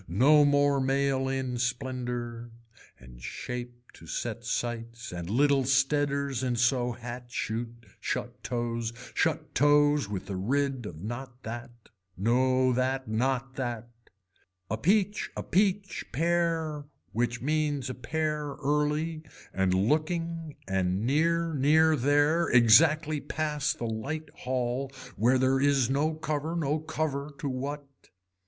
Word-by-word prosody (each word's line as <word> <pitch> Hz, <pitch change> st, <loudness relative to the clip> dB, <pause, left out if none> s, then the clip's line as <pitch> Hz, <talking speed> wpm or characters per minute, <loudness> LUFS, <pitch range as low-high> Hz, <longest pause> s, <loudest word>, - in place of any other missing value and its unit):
No 140 Hz, -, +5 dB
more 145 Hz, -1 st, +3 dB
mail 135 Hz, 0 st, +1 dB
in 130 Hz, -2 st, -2 dB
splendor 125 Hz, -2 st, -3 dB, 0.5 s
and -, -, -14 dB
shape 120 Hz, -, -7 dB
to 80 Hz, -, -14 dB
set 115 Hz, +6 st, -4 dB
sights 115 Hz, 0 st, -3 dB
and 85 Hz, -1 st, -5 dB
little 140 Hz, +4 st, +3 dB
steaders 140 Hz, 0 st, +1 dB
in 125 Hz, -2 st, 0 dB
so 120 Hz, +1 st, +2 dB
hat 120 Hz, +1 st, -7 dB
shoot, 115 Hz, 0 st, -4 dB
shut -, -, -4 dB
toes, 120 Hz, -1 st, -2 dB, 0.2 s
shut -, -, 0 dB
toes 145 Hz, -3 st, +4 dB
with 100 Hz, -3 st, -4 dB
a -, -, -2 dB
rid 130 Hz, +4 st, -1 dB
of 80 Hz, -2 st, -9 dB
not 120 Hz, +3 st, -7 dB
that, 120 Hz, +2 st, -6 dB, 0.5 s
no 130 Hz, +5 st, +3 dB
that, 130 Hz, +1 st, 0 dB
not 130 Hz, +4 st, -1 dB
that. 120 Hz, -3 st, -3 dB, 0.8 s
A -, -, +2 dB
peach 205 Hz, -, +2 dB
a -, -, -3 dB
peach 195 Hz, 0 st, +1 dB
pear 165 Hz, -2 st, 0 dB, 0.3 s
which 120 Hz, +1 st, -1 dB
means 145 Hz, -1 st, 0 dB
a 130 Hz, -, -3 dB
pear 150 Hz, +3 st, -2 dB
early 150 Hz, +3 st, 0 dB, 0.3 s
and 95 Hz, -1 st, +1 dB
looking 155 Hz, -, 0 dB
and 95 Hz, +1 st, 0 dB
near 165 Hz, +4 st, +2 dB
near 155 Hz, +3 st, +4 dB
there, 145 Hz, +5 st, +3 dB
exactly 150 Hz, +6 st, +5 dB
pass 150 Hz, -2 st, -1 dB
the 120 Hz, -, -4 dB
light 135 Hz, +8 st, -4 dB
hall 130 Hz, +1 st, -2 dB, 0.2 s
where 125 Hz, +4 st, +3 dB
there 130 Hz, +1 st, +2 dB
is 135 Hz, -3 st, +3 dB
no 155 Hz, +3 st, +1 dB
cover 155 Hz, +1 st, -2 dB
no 155 Hz, -2 st, 0 dB
cover 150 Hz, -2 st, -3 dB
to 145 Hz, -, -4 dB
what. 140 Hz, +2 st, -4 dB
135 Hz, 130 wpm, -28 LUFS, 120-150 Hz, 0.8 s, No